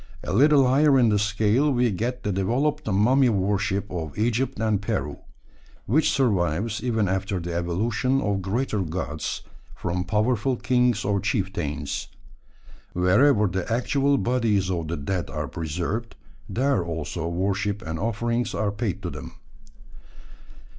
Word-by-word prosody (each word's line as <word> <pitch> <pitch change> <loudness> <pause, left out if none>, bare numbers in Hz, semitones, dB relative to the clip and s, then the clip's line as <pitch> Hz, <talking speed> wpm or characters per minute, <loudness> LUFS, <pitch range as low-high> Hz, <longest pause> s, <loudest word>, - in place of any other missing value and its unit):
A 90 - -3
little 140 +3 +5
higher 140 +2 +4
in 120 -3 +4
the 105 -1 +2
scale 105 +7 +2
we 125 -3 +2
get 120 +6 -3
the 105 - -1
developed 120 +11 0
mummy 120 +6 +4
worship 100 0 0
of 80 -5 -5
Egypt 120 +4 0
and 110 -3 +1
Peru, 100 -9 -3 0.7
which 145 +8 +3
survives 105 - 0
even 110 -5 +1
after 95 +1 -1
the 85 0 -5
evolution 110 +10 0
of 100 -5 -1
greater 105 +2 -1
gods, 80 -3 -4 0.3
from 90 +1 -2
powerful 115 +5 +1
kings 125 -3 +1
or 100 0 +1
chieftains. 90 - -2 0.9
Wherever 105 +6 +4
the 95 +2 -2
actual 140 +4 +2
bodies 115 -7 +1
of 85 -3 -2
the 85 +1 -3
dead 85 +5 -3
are 75 -2 -3
preserved, 90 - -4 0.3
there 130 -6 +1
also 85 0 -4
worship 100 +4 -1
and 80 0 -4
offerings 115 +3 -1
are 105 -2 0
paid 100 -2 -3
to 90 - -3
them. - - -8
105 Hz, 140 wpm, -25 LUFS, 90-120 Hz, 0.9 s, little